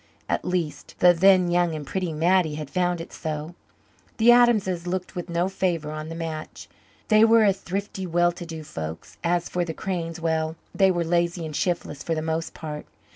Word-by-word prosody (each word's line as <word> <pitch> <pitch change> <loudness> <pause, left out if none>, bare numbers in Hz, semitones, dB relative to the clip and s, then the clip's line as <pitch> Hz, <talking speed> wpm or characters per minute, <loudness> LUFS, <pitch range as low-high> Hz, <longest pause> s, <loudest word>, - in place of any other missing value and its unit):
At - - -1
least 175 -4 -3
the 180 0 +6
then 180 0 +5
young 175 -2 +2
and 150 -2 -6
pretty 185 +2 -2
Mattie 165 0 +2
had 150 -2 -6
found 180 -1 0
it 165 - -8
so. 155 +1 -4 0.6
The 235 +1 +6
Adamses 210 -8 +3
looked 185 +2 -3
with 175 0 -5
no 170 +2 +1
favour 175 -5 -1
on 155 +1 -6
the 165 - -6
match. 160 -2 -6 0.4
They 215 0 +6
were 225 -1 +6
a 200 - +5
thrifty, 190 0 -5
well 175 +1 +3
to 175 0 -8
do 160 -1 -7
folk. 80 - -6 0.2
As 175 0 +1
for 180 - -1
the 165 -2 -5
Cranes 170 -3 -3
well, 160 -1 -1 0.2
they 195 -1 +4
were 175 -2 +1
lazy 170 0 0
and 155 -2 -6
shiftless, 170 -5 -2
for 165 - -1
the 155 - -2
most 160 +1 -2
part. 150 -2 -7
175 Hz, 195 wpm, -25 LUFS, 160-185 Hz, 0.6 s, the